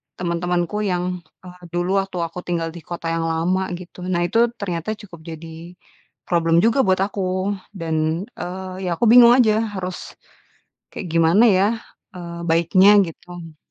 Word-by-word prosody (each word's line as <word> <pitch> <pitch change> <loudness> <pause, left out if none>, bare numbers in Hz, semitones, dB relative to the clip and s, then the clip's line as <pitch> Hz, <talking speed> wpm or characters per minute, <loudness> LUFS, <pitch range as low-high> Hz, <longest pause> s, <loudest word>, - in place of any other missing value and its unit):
teman-temanku 175 +2 -2
yang, 180 0 -2 0.2
eee, 180 0 -13
dulu 180 +3 +1
waktu 195 -2 -4
aku 165 +2 -5
tinggal 165 -2 -2
di 170 - -10
kota 170 -1 -4
yang 165 0 -1
lama, 180 +4 0
gitu. 180 0 -12
Nah, 175 -1 0
itu 230 +4 +3
ternyata 185 +2 -4
cukup 195 -6 -13
jadi 165 +2 -9 0.5
problem 165 -1 +2
juga 230 +4 +3
buat 185 0 +3
aku, 190 -1 -2 0.2
dan, 160 0 -1 0.2
eee, 185 +1 -6
ya - - 0
aku 235 - 0
bingung 240 -1 +9
aja, 220 -4 +4 0.2
harus 185 -1 -6 0.8
kayak 190 - -6
gimana 165 +6 +4
ya, 195 0 +4 0.5
eee, 170 -1 -7
baiknya, 170 +4 +5 0.2
gitu? 165 -1 -11
180 Hz, 150 wpm, -21 LUFS, 170-190 Hz, 0.8 s, bingung